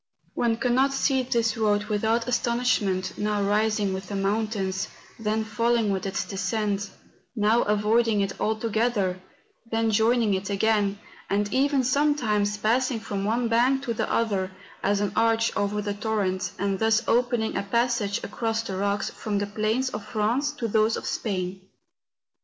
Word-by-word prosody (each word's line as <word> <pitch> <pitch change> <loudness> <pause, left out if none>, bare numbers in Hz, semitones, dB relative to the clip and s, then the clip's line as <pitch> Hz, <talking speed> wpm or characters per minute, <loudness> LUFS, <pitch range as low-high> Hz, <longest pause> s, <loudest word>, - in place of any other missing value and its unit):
One 230 -1 +1
cannot 260 +2 +2
see 270 -1 +2
this 235 -3 0
road 210 -2 +1
without 220 +2 0
astonishment, 235 -6 0
now 210 -1 0
rising 210 -1 +1
with 190 0 -5
the 200 - -5
mountains, 195 -1 -1 0.3
then 220 0 0
falling 230 0 +1
with 190 0 -2
its 195 - -2
descent; 200 0 -2 0.5
now 220 +2 +3
avoiding 210 +1 +2
it 195 0 -3
altogether, 215 -3 0 0.5
then 225 0 +1
joining 225 0 +3
it 190 +1 -2
again, 205 0 +1 0.3
and 205 0 0
even 275 0 +2
sometimes 245 -7 +1
passing 235 +3 +1
from 200 -3 -4
one 235 +3 +1
bank 250 +4 +2
to 240 -4 -1
the - - -2
other, 200 -5 0 0.3
as 200 +1 +1
an 205 - 0
arch 225 0 +2
over 205 +1 -1
the 205 0 -2
torrent, 205 -3 -1
and 195 0 -1
thus 225 +1 +2
opening 240 -2 +1
a 195 - 0
passage 230 0 0
across 225 +1 -2
the 195 -4 -5
rocks 200 +1 -1
from 210 -2 -3
the 205 - 0
plains 220 +5 -1
of 210 - -5
France 225 +7 0
to 245 -5 -3
those 220 +1 +2
of - - -6
Spain. 185 -3 -3
215 Hz, 155 wpm, -26 LUFS, 200-235 Hz, 0.5 s, now